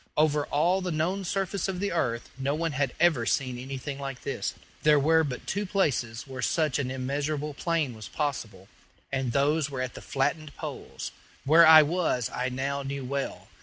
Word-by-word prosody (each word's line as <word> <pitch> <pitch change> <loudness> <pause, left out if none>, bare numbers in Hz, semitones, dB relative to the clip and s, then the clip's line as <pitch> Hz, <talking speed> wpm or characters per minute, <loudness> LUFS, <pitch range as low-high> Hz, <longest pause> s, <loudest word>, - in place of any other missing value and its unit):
Over 150 -1 +3
all 175 +6 +2
the 180 - -2
known 175 +5 0
surface 195 +1 -1
of 190 -2 -3
the 200 +1 -1
earth 120 -8 -1
no 135 +2 -1
one 165 +1 -1
had 135 -2 0
ever 165 -8 +4
seen 125 -2 0
anything 135 +2 -5
like 135 -2 -5
this; - - -3 0.3
there 150 -1 +5
were 160 +3 +4
but 130 -5 -5
two 200 +2 -1
places 135 - 0
where 130 -2 -7
such 155 -1 +1
an 130 -2 -1
immeasurable 145 +3 -2
plain 160 -4 -1
was 110 -2 -9
possible, 110 -10 -3 0.4
and 130 -3 -1
those 145 +3 +2
were 135 -3 -5
at 130 -1 -2
the - - -9
flattened 145 +2 -1
poles. - - -6 0.3
Where 160 +3 +7
I 160 -1 +10
was 150 -7 0
I 125 +1 -1
now 135 +2 -2
knew 135 -1 -4
well. 140 +1 -3
140 Hz, 185 wpm, -28 LUFS, 130-160 Hz, 0.4 s, I